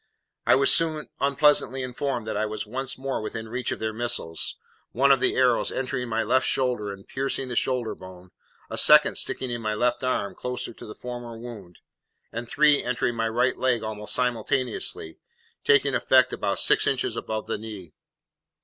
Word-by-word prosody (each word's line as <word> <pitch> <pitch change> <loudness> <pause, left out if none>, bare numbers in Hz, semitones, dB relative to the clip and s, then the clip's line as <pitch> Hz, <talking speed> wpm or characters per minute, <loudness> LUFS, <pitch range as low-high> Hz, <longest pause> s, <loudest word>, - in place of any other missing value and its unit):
I - - +7
was 140 +1 +5
soon 160 -2 +2
unpleasantly 140 -2 +2
informed 125 -2 -3
that 110 - -4
I 110 +1 0
was 105 0 -5
once 130 +4 -4
more 135 -2 -3
within 110 +1 -5
reach 125 +1 -2
of - - -2
their 110 0 -3
missiles, 115 -8 -1 0.4
one 140 +3 +4
of 135 - +5
the - - +1
arrows 125 -2 +3
entering 125 -2 -3
my 115 0 0
left 130 +4 +2
shoulder 125 -6 0
and 100 0 -11
piercing 135 -1 -2
the 125 - -4
shoulder 125 -2 0
bone, 90 -1 -13 0.4
a - - -1
second - - +6
sticking 130 -2 -2
in 120 -1 -3
my 110 -1 -2
left 120 +3 0
arm, 115 -6 -1
close 125 0 -4
to - - -6
the 105 - -10
former 120 -2 -7
wound, 110 -7 -10 0.5
and 115 +1 -6
three 150 -1 +4
entering 125 0 -1
my 115 0 0
right 125 +3 +1
leg 125 -3 +1
almost 105 -1 -4
simultaneously, 125 -8 -1 0.4
taking 140 -1 +4
effect 130 0 +4
about - - -1
six - - +3
inches - - 0
above 110 0 -4
the - - -3
knee. 105 -7 -9
120 Hz, 180 wpm, -25 LUFS, 110-130 Hz, 0.5 s, I